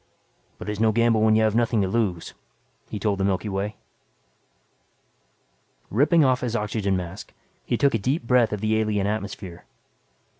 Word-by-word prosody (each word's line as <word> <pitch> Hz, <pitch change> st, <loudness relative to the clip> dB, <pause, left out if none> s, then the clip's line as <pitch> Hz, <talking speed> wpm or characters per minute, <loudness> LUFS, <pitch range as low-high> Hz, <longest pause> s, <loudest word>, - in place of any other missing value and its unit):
"But -, -, -9 dB
it's 105 Hz, -1 st, -3 dB
no 110 Hz, 0 st, +3 dB
gamble 115 Hz, 0 st, +2 dB
when 110 Hz, 0 st, +4 dB
you 110 Hz, -, +3 dB
have 110 Hz, -1 st, +2 dB
nothing 115 Hz, -2 st, +2 dB
to -, -, 0 dB
lose," 95 Hz, -5 st, -2 dB, 0.6 s
he -, -, -4 dB
told 100 Hz, -1 st, -1 dB
the -, -, 0 dB
Milky 100 Hz, +2 st, 0 dB
Way. 100 Hz, +2 st, -3 dB, 2.2 s
Ripping 150 Hz, -, +4 dB
off 130 Hz, -1 st, +2 dB
his 120 Hz, -2 st, -2 dB
oxygen 105 Hz, -3 st, -1 dB
mask, 90 Hz, +1 st, -7 dB, 0.3 s
he -, -, 0 dB
took 140 Hz, -, +2 dB
a 115 Hz, -, +1 dB
deep 130 Hz, +9 st, -1 dB
breath 120 Hz, -1 st, +3 dB
of 105 Hz, -1 st, -3 dB
the 110 Hz, 0 st, +1 dB
alien 105 Hz, -2 st, 0 dB
atmosphere. 100 Hz, -4 st, -5 dB
110 Hz, 165 wpm, -24 LUFS, 100-115 Hz, 2.2 s, when